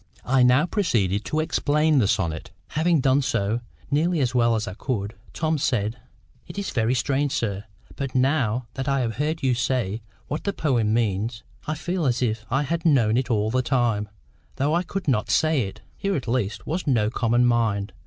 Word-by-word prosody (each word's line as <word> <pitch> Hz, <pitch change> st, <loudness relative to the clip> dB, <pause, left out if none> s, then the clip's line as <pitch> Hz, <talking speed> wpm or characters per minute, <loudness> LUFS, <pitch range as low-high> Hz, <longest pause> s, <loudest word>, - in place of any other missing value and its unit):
I 130 Hz, 0 st, +3 dB
now 125 Hz, +5 st, +5 dB
proceeded 115 Hz, -, 0 dB
to 155 Hz, -, 0 dB
explain 150 Hz, -1 st, +2 dB
the 105 Hz, -, +3 dB
sonnet. 85 Hz, -7 st, -1 dB, 0.2 s
Having 160 Hz, -1 st, +2 dB
done 135 Hz, +2 st, +3 dB
so, 115 Hz, -2 st, 0 dB, 0.3 s
nearly 165 Hz, +4 st, +2 dB
as 125 Hz, -3 st, +1 dB
well 120 Hz, -2 st, +3 dB
as 110 Hz, -, -2 dB
I 95 Hz, -, -4 dB
could, 105 Hz, -2 st, -3 dB, 0.2 s
Tom 155 Hz, -1 st, -1 dB
said: 115 Hz, -2 st, 0 dB, 0.5 s
"It -, -, -10 dB
is 200 Hz, -, -3 dB
very 115 Hz, +1 st, +1 dB
strange, 140 Hz, +2 st, 0 dB
sir; 100 Hz, -2 st, -2 dB, 0.3 s
but 135 Hz, -2 st, -4 dB
now 130 Hz, -3 st, +1 dB
that 135 Hz, 0 st, -4 dB
I 135 Hz, -1 st, +2 dB
have 115 Hz, -2 st, -2 dB
heard 155 Hz, +2 st, -1 dB
you 130 Hz, -2 st, +3 dB
say 120 Hz, -3 st, -1 dB, 0.3 s
what 150 Hz, -, -3 dB
the 200 Hz, -, -1 dB
poem 120 Hz, -, +1 dB
means, 110 Hz, 0 st, 0 dB, 0.2 s
I 155 Hz, -, -1 dB
feel 175 Hz, 0 st, -1 dB
as 125 Hz, 0 st, +1 dB
if 110 Hz, -2 st, -2 dB
I 135 Hz, +4 st, +1 dB
had 165 Hz, +4 st, -2 dB
known 125 Hz, -9 st, +4 dB
it 130 Hz, +1 st, 0 dB
all 110 Hz, -2 st, +1 dB
the 130 Hz, +2 st, +2 dB
time, 115 Hz, -5 st, 0 dB, 0.5 s
though 145 Hz, +3 st, +1 dB
I 170 Hz, -, +3 dB
could 185 Hz, 0 st, -5 dB
not 120 Hz, -6 st, +1 dB
say 155 Hz, -9 st, +2 dB
it." 95 Hz, -, -11 dB, 0.2 s
Here 200 Hz, -1 st, -1 dB
at 130 Hz, -, -3 dB
least 115 Hz, -4 st, -1 dB
was 170 Hz, +2 st, -3 dB
no 110 Hz, -6 st, +2 dB
common 120 Hz, +1 st, +2 dB
mind. 110 Hz, -4 st, +1 dB
125 Hz, 195 wpm, -24 LUFS, 110-150 Hz, 0.5 s, now